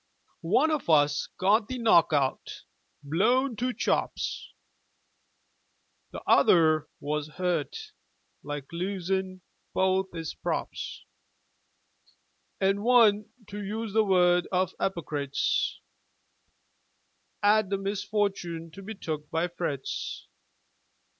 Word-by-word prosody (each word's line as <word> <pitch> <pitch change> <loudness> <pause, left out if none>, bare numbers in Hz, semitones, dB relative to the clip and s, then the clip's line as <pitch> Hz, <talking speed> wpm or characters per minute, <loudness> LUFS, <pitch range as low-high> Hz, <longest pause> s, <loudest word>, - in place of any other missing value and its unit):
One 315 - +4
of 300 - -2
us 145 -2 +3
got 205 +3 +3
the 255 - -4
knock 220 -10 +4
out, 140 -3 -1 0.4
blown 235 - +2
to 250 +3 0
chops. - - -2 1.6
T'other 155 -3 +4
was 150 0 -2
hurt, 180 - -3 0.5
like, 145 -2 -5
losin' 185 +1 -2 0.3
both 190 0 +2
'is 165 -2 -4
props. - - -4 1.5
An' 195 +1 +1
one, 215 -3 +4 0.2
to 205 +1 -6
use 215 +1 -4
the 220 0 +4
word 180 -3 +3
of 185 0 +1
'ypocrites, 145 -6 -1 1.6
'Ad 210 -1 +4
the 195 - 0
misfortoon 195 -4 -2
to 195 - -10
be 215 +3 -7
took 150 -5 -5
by 165 +2 0
Fritz. 150 -6 -4
190 Hz, 95 wpm, -28 LUFS, 160-210 Hz, 1.6 s, One